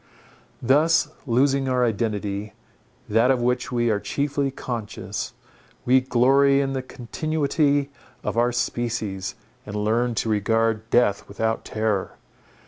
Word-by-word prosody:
Thus, 150 +5 +3 0.2
losing 135 +2 +2
our 125 -1 +2
identity, 105 -2 -2 0.5
that 115 +4 +3
of 130 -2 +3
which 125 +1 0
we 120 -2 +1
are 105 - +1
chiefly 140 +3 -1
conscious, 120 -5 -5 0.5
we 130 +1 +5
glory 135 +2 +4
in 135 -1 0
the 130 - -2
continuity 145 +2 -1 0.3
of - - -2
our 120 +1 +3
species, 115 -5 -2 0.3
and 105 -3 -8
learn 115 +3 +1
to 115 - -1
regard 110 +1 +1
death 115 -5 +2
without 110 +2 -2
terror. 110 -3 -2
120 Hz, 125 wpm, -24 LUFS, 110-135 Hz, 0.5 s, we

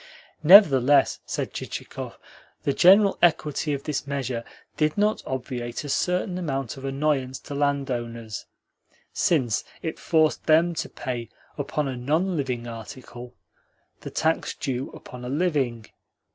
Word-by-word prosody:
Nevertheless, 145 - +7
said - - -3
Chichikov, - - -6 0.5
the 140 - +1
general 195 +5 +6
equity 155 -3 +2
of 140 -1 -2
this 145 -1 -3
measure 130 -4 -3 0.3
did 155 +2 +1
not 210 +1 +2
obviate 125 -2 -4
a 145 - -6
certain 180 +4 0
amount 135 -8 -3
of 135 - -11
annoyance 135 -2 0
to - - -8
landowners, 120 -6 -2 0.7
since 130 -10 +1 0.2
it 160 - -4
forced 155 -2 +1
them 165 +2 +4
to - - -4
pay 120 -3 -5 0.3
upon 145 0 -2
a 130 - -3
non 155 +9 0
living 130 -5 -2
article 120 +1 -9 0.6
the - - -7
tax 160 +1 0
due 130 -2 -3
upon 125 0 -11
a 125 - -5
living. 135 -7 0
140 Hz, 130 wpm, -25 LUFS, 125-155 Hz, 0.7 s, Nevertheless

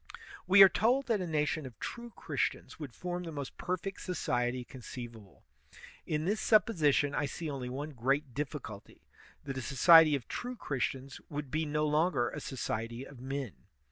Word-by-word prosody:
We 195 +1 +9
are - - +11
told 245 +8 +2
that 220 -5 +1
a 180 - -3
nation 150 -2 0
of 120 - -13
true 240 0 -6
Christians - - -3
would 145 -6 -7
form 180 0 -4
the 170 -2 -6
most 140 -3 -6
perfect 185 +2 -3
society 125 -8 -1
conceivable. 120 -5 -10 0.6
In 155 0 -1
this 210 +4 0
supix)sition 155 -10 +3
I 145 - 0
see 155 +3 -5
only 130 -3 -4
one 145 +4 -5
great 135 +1 0
diflBculty 135 -8 -6 0.2
— - - -26
that 135 -2 -4
a - - -2
so 135 +2 -5
ciety 165 +2 +8
of 135 - -5
true 250 +1 -4
Christians 135 - -3
would 145 -4 -5
be 155 0 0
no 150 +1 0
longer 150 -4 +2
a - - -5
society 115 -1 -4
of 135 -4 -12
men. 135 -3 -4
145 Hz, 175 wpm, -32 LUFS, 130-170 Hz, 0.6 s, are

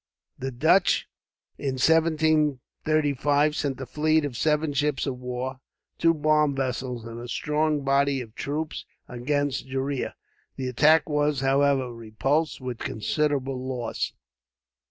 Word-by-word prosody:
The 135 - -3
Dutch, 160 +8 +3 0.5
in 135 -2 -1
1735, 150 -1 +2
sent 135 -3 -2
a 135 - -4
fleet 155 +4 +1
of 135 -4 -5
seven 150 +3 +1
ships 145 -1 0
of 130 -3 -3
war, 125 +1 -4 0.4
two 165 0 +4
bomb 150 -1 +2
vessels, 125 -2 -3
and 115 0 -7
a 120 - -7
strong 150 +3 0
body 140 0 +2
of 115 -4 -8
troops 150 +5 -4 0.2
against 135 +1 -1
Gheriah. 135 0 -2 0.4
The 130 -1 -3
attack 150 +5 +4
was, 150 -2 +1
however, 135 -2 +2
repulsed 125 +8 -1
with 125 -3 -5
considerable 135 +2 -1
loss. 125 -2 -3
140 Hz, 125 wpm, -26 LUFS, 130-150 Hz, 0.5 s, two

